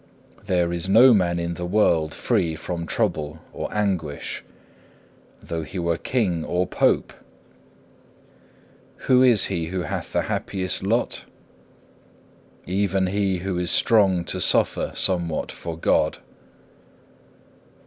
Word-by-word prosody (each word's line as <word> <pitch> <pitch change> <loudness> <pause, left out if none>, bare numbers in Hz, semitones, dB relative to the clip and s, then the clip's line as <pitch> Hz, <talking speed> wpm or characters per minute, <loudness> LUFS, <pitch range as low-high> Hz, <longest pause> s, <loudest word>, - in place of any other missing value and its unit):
There 85 -1 +1
is 85 +2 -2
no 120 +5 +7
man 90 -4 +2
in 85 0 -2
the 90 +1 -5
world 85 -6 +2
free 90 -9 0
from 85 +1 -5
trouble 75 -1 -1 0.2
or - - -5
anguish, 95 -9 -2 1.0
though 85 -1 -4
he 90 +5 -8
were 85 -1 0
King 90 -6 -1
or 90 +3 0
Pope. - - +1 1.9
Who 130 -1 +5
is 120 -6 +5
he 85 -4 -2
who 90 +1 -3
hath 75 - -5
the - - 0
happiest 95 -2 -3
lot? 115 +5 -1 1.4
Even 95 0 0
he 95 0 0
who 95 -2 -1
is 90 - 0
strong 95 -6 +3
to 95 +1 -4
suffer - - +2
somewhat 85 -4 0
for 85 -1 -7
God. - - +1
90 Hz, 120 wpm, -23 LUFS, 85-100 Hz, 1.9 s, no